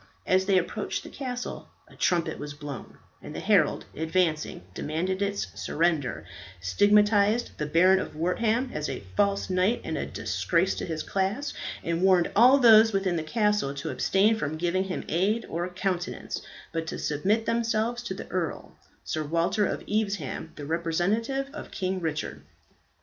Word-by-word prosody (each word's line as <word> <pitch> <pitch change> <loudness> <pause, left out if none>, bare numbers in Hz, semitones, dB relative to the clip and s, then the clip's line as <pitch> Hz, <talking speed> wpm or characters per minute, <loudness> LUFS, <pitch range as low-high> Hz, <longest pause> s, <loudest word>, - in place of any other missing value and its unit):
As 185 +1 +2
they 195 -2 +4
approached 175 -1 -2
the - - -9
castle 250 -2 -5 0.2
a - - -17
trumpet 175 -2 0
was 145 0 -6
blown, 145 -3 -8 0.2
and - - -9
the - - -3
herald, - - +2
advancing, 160 - 0
demanded 180 - -2
its 200 0 0
surrender, 150 - -1 0.3
stigmatized 205 - +3
the 150 - -1
Baron 185 +5 +5
of - - -5
Wortham 220 +10 0
as 150 - -2
a - - -5
false 200 -1 +2
knight 185 +5 +2
and 160 - -3
a - - -3
disgrace 110 - 0
to - - -5
his 160 -2 -3
class, 200 +9 -1 0.3
and 170 0 -1
warned 185 -2 +4
all 250 +5 +7
those 225 -3 +7
within 195 -2 +1
the 165 - 0
castle 210 -4 0
to 140 - -4
abstain 205 +3 +3
from 155 -8 -3
giving 175 +3 0
him 185 - -4
aid 200 +7 +1
or 175 +2 -3
countenance, 180 -1 -3 0.3
but 165 -1 -2
to - - -4
submit 200 +10 0
themselves 230 +1 0
to 190 - -5
the - - -8
earl, 175 -3 -3 0.3
Sir 155 - -2
Walter 170 +7 +1
of - - -3
Evesham, 200 -7 -2
the 145 - -7
representative 185 - 0
of 305 - -8
King 185 0 -2
Richard. 155 -2 -3
185 Hz, 160 wpm, -27 LUFS, 160-210 Hz, 0.3 s, all